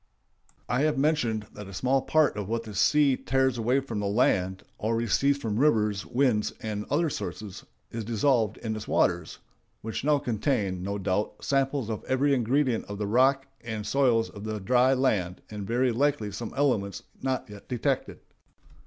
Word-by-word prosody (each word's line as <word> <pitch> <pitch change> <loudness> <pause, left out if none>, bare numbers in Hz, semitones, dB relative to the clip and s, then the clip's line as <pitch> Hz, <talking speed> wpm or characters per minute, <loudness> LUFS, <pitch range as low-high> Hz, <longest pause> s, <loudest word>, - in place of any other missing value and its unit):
I 125 +2 +1
have 155 -1 +1
mentioned 130 -7 +1
that 105 -1 -9
a 95 - -10
small 130 +7 +2
part 155 0 +2
of 105 -1 -4
what 115 0 -1
the 110 - -9
sea 140 +7 +4
tears 130 -1 0
away 125 +4 +2
from 115 -6 -4
the 100 - -1
land, 95 -3 +1 0.2
or 110 +2 0
receives 125 +5 +2
from 110 -5 -2
rivers, 105 -8 +2
winds, 120 -5 +1
and 105 -3 -4
other 160 +4 +2
sources, 95 - -6 0.3
is 115 -1 -4
dissolved 115 0 +1
in 110 -1 -4
its 110 - -7
waters, 85 -2 +1 0.5
which 110 +2 -4
now 150 0 +3
contain, 110 -7 -1
no 100 +2 -3
doubt, 100 +1 -2
samples 135 -3 +1
of 110 -2 -4
every 140 +2 +2
ingredient 130 0 +1
of 100 - -7
the 105 - -2
rocks 130 +5 +3 0.2
and 110 -3 -4
soils 115 -1 +2
of 100 - -10
the 110 0 -3
dry 125 +6 +3
land, 100 -9 0
and 105 -2 -6
very 125 +2 +2
likely 125 -4 0
some 110 +3 -6
elements 110 -9 0 0.2
not 130 -1 -2
yet 105 -1 -12
detected. 130 +2 -1
115 Hz, 175 wpm, -27 LUFS, 105-135 Hz, 0.5 s, sea